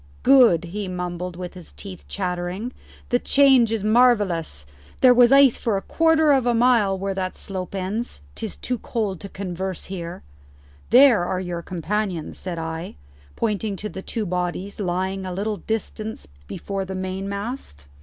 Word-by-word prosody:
"Good," 245 - +6
he 195 +3 -5
mumbled 180 -1 -4
with 180 0 -6
his 180 -2 -10
teeth 190 -3 -10
chattering. 180 +5 -3 0.4
"The 245 - +2
change 265 -5 +5
is 225 -3 -1
marvellous. 205 - +2 0.4
There 255 -1 +8
was 245 0 +6
ice 275 -3 +6
for 220 -4 0
a 195 - -5
quarter 320 -2 +3
of 265 -3 +3
a 240 - +3
mile 230 -5 +3
where 195 +1 -2
that 185 -1 -3
slope 190 0 -6
ends. 195 - -3
'Tis 220 - -6
too 250 -2 -3
cold 205 -6 -2
to 200 - -8
converse 190 -1 -5
here." 170 - -6 0.7
"There 245 -6 +7
are 180 +1 -1
your 175 -2 -4
companions," 185 0 -3
said 180 -2 -5
I, 160 +1 -5 0.4
pointing 210 -2 -1
to 210 +2 -5
the 190 - -7
two 220 +2 -3
bodies 180 +2 -3
lying 190 0 -2
a 185 - -4
little 205 +3 -2
distance 220 - -4 0.2
before 195 - -4
the 190 0 -6
mainmast. 195 - -5
195 Hz, 160 wpm, -23 LUFS, 180-225 Hz, 0.7 s, There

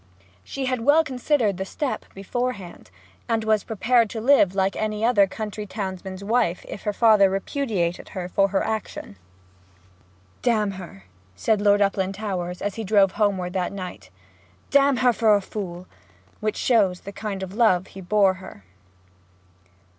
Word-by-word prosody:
She 270 - -5
had 255 -2 -1
well 290 +6 +5
considered 255 - 0
the 190 - -2
step 275 +7 -4
beforehand, 200 -1 -4 0.4
and 225 -1 +1
was 215 -2 +2
prepared 230 +1 +2
to 225 - -5
live 220 -6 +4
like 195 0 +1
any 215 0 -1
other 205 -5 +4
country 210 +1 -6
townsman's 190 -1 -6
wife 200 -5 0
if - - -7
her 210 - +1
father 210 -2 +5
repudiated 195 - -2
her 180 -1 -3
for 195 +2 +2
her 195 0 0
action. 215 - -5 1.2
'D - - +1
her!' 195 - -2 0.3
said 215 - +1
Lord 205 0 +4
Uplandtowers, 190 -2 -2
as 205 -1 -1
he 225 - -5
drove 200 -2 +4
homeward 190 -4 0
that 185 -2 -1
night. 185 - -8 0.6
'D 280 - +7
her 255 -3 +3
for 220 -2 +4
a - - +2
fool!' 185 -3 -6 0.5
which 215 -1 -2
shows 200 -7 +2
the 200 - -8
kind 200 -2 -5
of 190 0 -7
love 205 -5 +3
he 195 - -11
bore 195 +1 +3
her. 100 - -12
205 Hz, 155 wpm, -24 LUFS, 190-225 Hz, 1.2 s, D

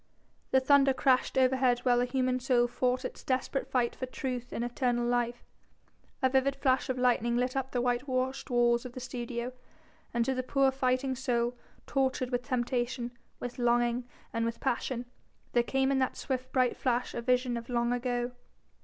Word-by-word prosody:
The 265 - +5
thunder 275 0 +5
crashed 260 0 +2
overhead 255 -1 +3
while 245 -1 +3
a - - +2
human 255 0 0
soul 245 -1 +3
fought 250 +1 0
its - - -6
desperate 265 +1 -1
fight 245 -2 +1
for 255 - -4
truth 250 -2 -4
and 235 - -2
eternal 240 0 0
life. 240 0 0 0.8
A 260 - +5
vivid 265 +1 +2
flash 265 -1 +1
of 260 - -1
lightning 240 -1 +2
lit 250 +1 0
up 265 -1 -1
the 245 -2 -1
white 245 +2 0
washed 260 0 -1
walls 240 -1 +3
of 250 - -8
the 255 - -6
studio, 245 -1 -4 0.6
and 235 0 +1
to 265 - +1
the 255 - -1
poor 270 +1 +2
fighting 260 0 0
soul, 240 -1 0 0.3
tortured 260 -2 0
with 245 0 0
temptation, 245 -1 -1 0.3
with 245 0 -6
longing 240 0 +2 0.3
and 230 -1 0
with 230 0 -2
passion, 250 -1 -1 0.5
there 240 - +5
came 265 +2 +1
in 270 - +2
that 260 - 0
swift 255 -1 -3
bright 255 -2 +2
flash 250 -1 -1
a 235 - -3
vision 250 0 +1
of 235 +1 -6
long 240 0 +1
ago. 245 0 -1
250 Hz, 180 wpm, -30 LUFS, 240-260 Hz, 0.8 s, The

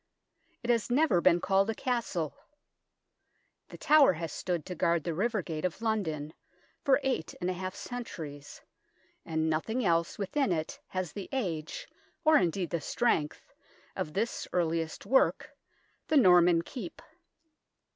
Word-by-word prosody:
It 240 - +2
has 230 -1 +1
never 250 - +3
been 175 -1 +5
called 195 +3 +2
a 225 - -1
castle. 230 - -2 1.3
The - - -10
Tower 300 -7 +6
has 165 -1 -5
stood 175 -4 -2
to 180 - -5
guard 170 -1 +1
the 170 - -2
river 210 +3 0
gate 155 -2 -5
of 180 -2 -2
London 165 -10 -2 0.5
for 275 0 +4
eight 260 -12 -1
and 180 +1 -1
a - - -2
half 185 +1 -5
centuries, 155 -12 -7 0.7
and 160 0 0
nothing 220 +10 -1
else 170 -1 +1
within 205 +4 0
it 160 -2 -2
has 185 -4 -3
the 200 - -7
age, 170 - -3 0.4
or 310 0 +6
indeed 180 0 -1
the 170 -2 -1
strength, 155 - -1 0.4
of 150 - -4
this 220 +4 -2
earliest 165 -1 -1
work, 265 +6 +2 0.6
the 310 - +3
Norman 175 -6 +6
Keep. 200 -2 -8
180 Hz, 145 wpm, -30 LUFS, 165-230 Hz, 1.3 s, Tower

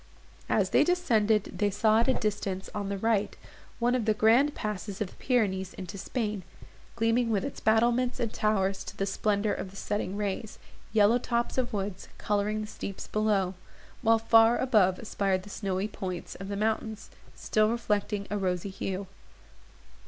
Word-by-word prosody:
As - - +2
they - - +5
descended, 225 - +1
they 205 -1 +3
saw 215 +2 +3
at 235 - +2
a 260 - +3
distance, 195 -3 -2
on 200 -1 -3
the 200 - -2
right, 215 0 0 0.4
one 240 +1 +2
of 250 -4 0
the 215 -1 +2
grand 235 +8 +4
passes 210 -1 -4
of 210 -4 -2
the - - -17
Pyrenees 190 -7 0
into 185 +1 -7
Spain, 210 +1 -3 0.5
gleaming 230 +1 +2
with 210 -3 +1
its 280 - -6
battlements 240 +3 +2
and 230 -2 -2
towers 195 -2 +1
to - - -9
the 195 - 0
splendour 205 +1 0
of 190 - -5
the 195 - -16
setting 200 -1 -3
rays, 210 +1 -3 0.3
yellow 220 +2 +4
tops 240 -1 -1
of 250 - -1
woods 200 -2 -4
colouring 210 +1 0
the - - -3
steeps 200 -2 -6
below, 205 -3 +1 0.5
while 225 -1 +5
far 225 +1 +5
above 205 -8 +3
aspired 195 -4 -1
the 205 - -11
snowy 195 -1 -2
points 185 -4 -5
of 195 - -8
the 200 0 -3
mountains, 220 0 -2 0.2
still 215 0 +2
reflecting 210 -3 -1
a 205 - 0
rosy 185 0 -1
hue. 195 0 -4
210 Hz, 170 wpm, -29 LUFS, 195-225 Hz, 0.5 s, they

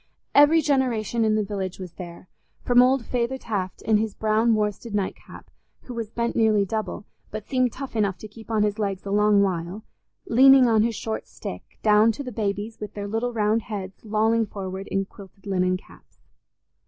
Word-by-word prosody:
Every 290 +3 +6
generation 240 -5 +1
in 215 -1 +2
the 215 - +1
village 195 -2 -4
was 185 -3 -8
there, 175 0 -10 0.4
from 245 0 +5
old 255 -1 +3
"Feyther 245 +1 -1
Taft" 195 -7 -4
in 220 -1 +3
his 215 -1 -2
brown 220 +1 +2
worsted 210 +1 -2
night 200 -2 -1
cap, - - -14 0.3
who 250 - -9
was 230 -3 -4
bent 235 +1 -2
nearly 215 -3 +3
double, 215 0 -4 0.2
but 215 -1 -6
seemed 255 -2 +1
tough 270 -1 -8
enough 200 -4 +1
to 215 - -9
keep 220 +2 -14
on 220 -2 +2
his 210 +1 -1
legs 200 -3 -2
a 195 - -4
long 210 0 +4
while, 185 +2 -3 0.4
leaning 265 +2 +7
on 225 -3 +4
his 230 +1 0
short 220 +1 -4
stick, - - -9
down 215 +1 +5
to 285 - -6
the 250 - -6
babies 210 0 -3
with 210 -1 -7
their 205 -1 -4
little 225 +4 -1
round 220 0 +1
heads 195 -3 -7
lolling 220 +1 +1
forward 190 -1 -6
in 195 0 -1
quilted 195 0 -15
linen 185 -2 +1
caps. - - -20
215 Hz, 190 wpm, -24 LUFS, 200-230 Hz, 0.4 s, leaning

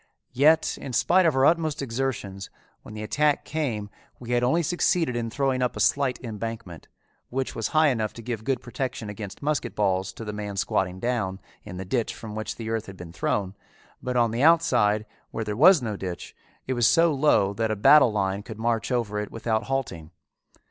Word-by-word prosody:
Yet 155 +5 +3
in 130 - -6
spite 185 +7 +4
of 155 - +1
our 135 0 +4
utmost 160 -2 +2
exertions 115 -7 -3 0.3
when 105 - -11
the 110 - -5
attack 145 +6 +1
came 120 -10 -3 0.3
we 120 -1 -7
had 120 0 +2
only 165 +8 +2
succeeded 165 -4 +1
in 115 -1 -2
throwing 135 +1 0
up 125 - 0
a - - -6
slight 140 -3 +2
embankment, 110 -6 -6 0.4
which 130 +1 -3
was 115 - -2
high 155 -1 +3
enough 110 -5 -1
to 115 - -10
give 115 -2 -4
good 130 0 -1
protection 120 -3 -4
against 105 +3 -8
musket 145 -5 -1
balls 95 -2 0
to 115 - -8
the 105 - -5
man 105 -1 -5
squatting 95 -1 -1
down 100 -5 -2 0.2
in 90 - -8
the 95 - -5
ditch 115 +4 -1
from 110 -2 -8
which 110 0 -4
the 115 -1 -5
earth 115 -1 -2
had 95 -1 -10
been 85 -1 -10
thrown; 95 +1 -1 0.5
but 125 0 -2
on 120 -2 +3
the 115 +2 -2
outside, 120 -10 +4 0.2
where 110 - -4
there 105 -1 -3
was 160 - +6
no 110 -3 -3
ditch, 90 -3 -6 0.3
it 130 - -1
was 120 -1 +3
so 165 -1 +4
low 135 -9 +3
that 110 +2 -1
a 110 - 0
battle 135 +4 +6
line 100 -1 -1
could 110 0 -9
march 115 +1 -1
over 110 -4 -1
it 105 - -4
without 115 0 -2
halting. 115 -13 -3
115 Hz, 205 wpm, -25 LUFS, 105-135 Hz, 0.5 s, was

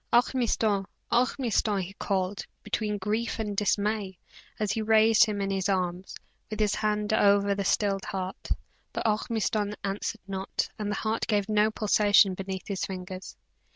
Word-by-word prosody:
"Ormiston! 230 -5 +2 0.2
Ormiston!" 235 -4 +1
he 185 +2 -7
called, 195 -1 -2 0.2
between 210 -2 -1
grief 215 +4 -1
and 210 -2 -3
dismay, 205 -1 0 0.4
as 210 -2 0
he 225 - -1
raised 220 0 +5
him 210 -2 -3
in 195 0 -1
his 195 0 0
arms, 185 -1 -1 0.3
with 215 - -5
his 210 -1 +2
hand 210 0 0
over 200 -1 +4
the 200 0 -2
stilled 195 0 +1
heart; 190 -1 -5 0.4
but - - -3
Ormiston 215 -1 0
answered 200 +2 -3
not, 190 -1 -2
and 210 -1 -2
the 205 - -1
heart 220 +2 -1
gave 205 -2 +1
no 215 0 +3
pulsation 205 -2 +4
beneath 190 0 -5
his 200 -2 -3
fingers. 185 0 -6
205 Hz, 155 wpm, -28 LUFS, 195-215 Hz, 0.4 s, raised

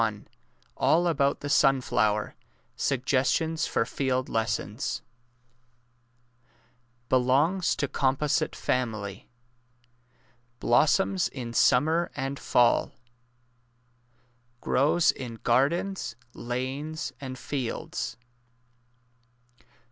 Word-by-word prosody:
207 110 -2 -2 0.5
ALL 175 +2 +3
ABOUT 140 -4 +1
THE 145 - -4
SUNFLOWER 115 -7 +2 0.4
SUGGESTIONS 135 +5 0
FOR - - 0
FIELD 130 +1 -1
LESSONS 110 +2 -2 2.0
Belongs 140 +9 +2
to 140 - -1
composite 145 +4 0
family. 110 -6 -3 1.3
Blossoms 160 +9 +3
in 120 -4 -7
smnmer 155 +9 +3
and 135 0 -3
fall. 120 -1 +2 1.7
Grows 155 +7 +3
in 120 -3 -7
gardens, 145 +6 +1 0.2
lanes, 135 +7 -4
and 130 -1 -6
fields. 130 -2 -4
135 Hz, 70 wpm, -27 LUFS, 120-155 Hz, 2.0 s, ALL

